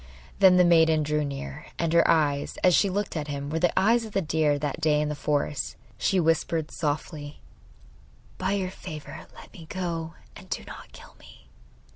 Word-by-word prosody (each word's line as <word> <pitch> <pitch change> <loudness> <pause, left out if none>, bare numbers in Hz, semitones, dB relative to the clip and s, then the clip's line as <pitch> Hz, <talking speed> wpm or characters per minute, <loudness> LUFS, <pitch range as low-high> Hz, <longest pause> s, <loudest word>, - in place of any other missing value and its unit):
Then 190 -2 +7
the 180 - +6
maiden 160 -2 +4
drew 150 0 0
near, 140 +2 -6
and 165 -1 -1
her 170 0 +5
eyes, 145 -3 +1
as 180 - +5
she 200 - +4
looked 205 +1 -2
at 155 -2 -3
him, 140 0 -4
were 160 - -1
the 175 +1 +3
eyes 230 +4 +3
of 220 -2 -9
the 195 - +1
deer 155 -2 +1
that 145 +2 -3
day 150 -1 +3
in 150 0 0
the - - -2
forest. 145 -1 -1 0.2
She 195 - +2
whispered 165 -1 0
softly: 150 -1 -4 1.0
'By 190 +1 0
your 190 -2 -1
favour 155 -6 -9
let - - -14
me 165 -3 -12
go, 165 -3 -4 0.2
and - - -13
do - - -3
not - - -11
kill - - -14
me. - - -17
160 Hz, 190 wpm, -26 LUFS, 150-180 Hz, 1.0 s, Then